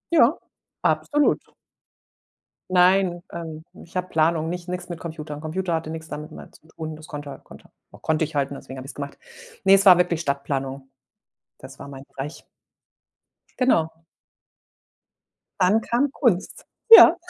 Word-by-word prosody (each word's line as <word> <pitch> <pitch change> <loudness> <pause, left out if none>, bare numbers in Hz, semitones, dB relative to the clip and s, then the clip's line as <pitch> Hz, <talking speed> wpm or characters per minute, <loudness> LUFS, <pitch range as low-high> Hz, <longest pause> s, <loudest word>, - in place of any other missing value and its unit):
Ja, 280 +1 +5 0.4
absolut. 295 -1 +2 1.3
Nein, 180 -1 +3
ähm, 160 -2 -7 0.2
ich 170 - -19
habe 180 0 -2
Planung, 160 -1 +1
nicht 180 0 -6
nix 180 0 -4
mit 170 - -6
Computer. 155 -3 -7
Computer 170 +3 -3
hatte 160 -1 -2
nix 160 0 -7
damit 155 0 -7
mehr - - -11
zu - - -21
tun, 160 -1 -7
das 155 0 -13
konnte 145 -2 -8
konnte - - -16 0.2
konnte 160 0 -1
ich 155 0 -11
halt 140 -1 +1
und 140 - -7
deswegen 130 -1 -10
habe 130 - -8
ich's - - -9
gemacht. 140 -1 -7 0.5
Ne, 195 - +7
es 195 +1 +5
war 180 -2 +9
wirklich 175 -2 +1
Stadtplanung. 140 -2 -3 0.7
Das - - -12
war - - -9
mein 135 -1 -10
Bereich. 140 +4 -8 1.1
Genau. 170 -11 +2 1.7
Dann 195 +5 +4
kam 260 +4 0
Kunst. 220 -11 0 0.2
Ja. 450 -6 +11
160 Hz, 150 wpm, -23 LUFS, 150-185 Hz, 1.7 s, Ja